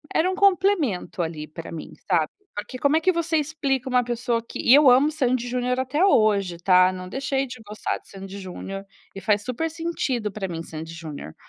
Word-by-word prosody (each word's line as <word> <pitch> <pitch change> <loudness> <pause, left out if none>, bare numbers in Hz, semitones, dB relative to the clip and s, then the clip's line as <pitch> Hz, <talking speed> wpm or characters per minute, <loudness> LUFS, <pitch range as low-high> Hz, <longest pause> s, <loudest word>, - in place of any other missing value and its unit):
era 360 +4 +3
um - - -3
complemento, 370 - +2
ali, 160 -2 -4
pra 165 +2 -9
mim, 165 - -7 0.2
sabe. 165 -4 +2 0.2
Porque 255 +5 -6
como 285 +3 +3
é - - 0
que 370 - +4
você 335 -2 0
explica 285 -4 -1
uma 250 -1 +3
pessoa 240 0 -1
que - - -8
e 245 - +5
eu 290 -1 +8
amo 265 +5 +5
Sandy& 255 -5 0
Junior 250 +1 0
até 260 +6 0
hoje, 205 - +3
tá, 185 +1 +5
não 185 0 -7
deixei 270 +4 -1
de 250 -3 -9
gostar 210 +1 -3
de - - -24
Sandy& 195 0 -8
Junior, 195 +1 -7 0.3
e 195 - -7
faz 205 +1 +1
super 260 +8 -2
sentido 310 -9 -2
pra 195 -1 -4
mim 165 -2 -5
Sandy& 160 0 -8
Junior. 155 - -8
240 Hz, 205 wpm, -24 LUFS, 185-285 Hz, 0.3 s, eu